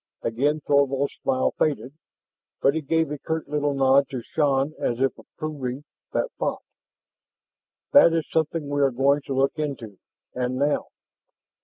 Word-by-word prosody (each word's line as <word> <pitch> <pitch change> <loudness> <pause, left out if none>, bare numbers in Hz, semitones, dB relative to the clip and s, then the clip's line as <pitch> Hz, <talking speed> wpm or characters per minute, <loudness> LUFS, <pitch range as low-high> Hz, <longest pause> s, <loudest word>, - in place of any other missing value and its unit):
Again 145 +7 0
Thorvald's 140 -1 +2
smile 130 0 +1
faded, 140 -3 0 0.7
but 140 - +3
he 160 - -1
gave 160 +1 0
a 150 - -4
curt 160 +2 -3
little 145 -1 0
nod 135 0 +4
to 125 -3 -5
Shann 140 0 +1
as 120 0 -1
if 135 0 +1
approving 140 -3 -6 0.3
that - - -1
thought. - - -2 1.3
"That 285 -12 +8
is 165 -1 -1
something 160 -1 -1
we 145 0 -1
are 140 - +5
going 135 +3 +2
to 135 - -2
look 135 +3 +1
into, 120 -10 -4 0.3
and 125 0 -2
now! 145 +3 0
140 Hz, 150 wpm, -24 LUFS, 135-150 Hz, 1.3 s, That